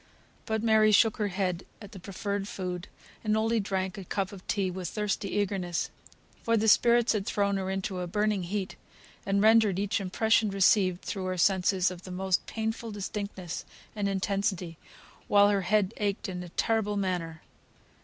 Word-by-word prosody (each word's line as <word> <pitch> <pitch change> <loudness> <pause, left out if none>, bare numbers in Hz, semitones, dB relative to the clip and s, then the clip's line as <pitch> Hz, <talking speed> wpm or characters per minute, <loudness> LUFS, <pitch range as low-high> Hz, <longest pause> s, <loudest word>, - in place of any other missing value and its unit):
But 220 -1 -1
Mary 220 -1 +5
shook 220 +1 +4
her 210 - 0
head 185 -2 -2 0.2
at 205 -2 -11
the 195 - -10
proffered 200 +1 -4
food, 180 -2 -5 0.4
and 215 -1 +1
only 225 +1 +1
drank 195 0 -2
a - - -6
cup 190 +1 -2
of 195 -2 -10
tea 195 -3 0
with 180 -2 -5
thirsty 210 -2 -2
eagerness. 190 -4 -1 0.5
For 230 0 +2
the 220 +1 +1
spirits 235 +2 +5
had 210 -2 -2
thrown 200 -1 +1
her 190 -1 -3
into 190 -1 -3
a 180 - -3
burning 210 +2 0
heat, 190 +2 -3 0.5
and 200 +1 +2
rendered 220 -3 +5
each 200 0 0
impression 220 +3 +2
received 190 -2 +3
through 190 -2 -4
her 185 0 -2
senses 185 0 +2
of 180 -1 -9
the 185 - -11
most 185 0 0
painful 225 +1 -3
distinctness 200 -3 -5 0.3
and 205 -2 -1
intensity, 190 -3 -2 0.5
while 205 0 +6
her 200 -1 +2
head 195 +1 +1
ached 205 -2 -1
in 180 -2 -5
a 180 - -8
terrible 210 +2 0
manner. 175 -5 -2
200 Hz, 175 wpm, -28 LUFS, 185-210 Hz, 0.5 s, while